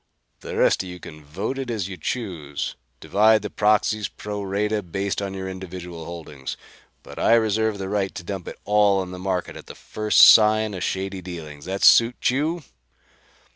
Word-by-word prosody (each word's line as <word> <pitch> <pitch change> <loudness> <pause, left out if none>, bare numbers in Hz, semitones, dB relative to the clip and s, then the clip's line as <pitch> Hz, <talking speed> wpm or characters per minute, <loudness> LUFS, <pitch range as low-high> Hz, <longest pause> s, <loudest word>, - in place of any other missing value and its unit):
The - - -7
rest - - +3
of 95 - -8
you 90 0 -9
can 75 -3 -11
vote 100 - -4
it 130 -2 -4
as 105 -6 -2
you 95 - -7
choose: 80 - -4 0.2
divide 110 +1 +3
the 105 - -5
proxies 105 0 +1
pro 105 -1 -6
rata, 105 +2 -1
based 95 +1 -3
on 100 -1 -4
your 95 0 -5
individual 90 -3 -8
holdings. 75 -6 -7 0.5
But - - -10
I 115 - +4
reserve 110 -1 +1
the 95 -1 -5
right 100 -1 -2
to - - -6
dump 95 -1 -6
it - - -7
all 105 -1 +3
on 95 -1 -4
the 90 - -8
market 90 -1 -3
at - - -11
the - - -10
first 110 0 0
sign 110 -1 +7
of 95 - -6
shady 95 +1 -3
dealings. 80 -5 -9
That 95 +1 -4
suit 120 +1 +5
you?" 155 +5 -1
95 Hz, 185 wpm, -23 LUFS, 90-105 Hz, 0.5 s, sign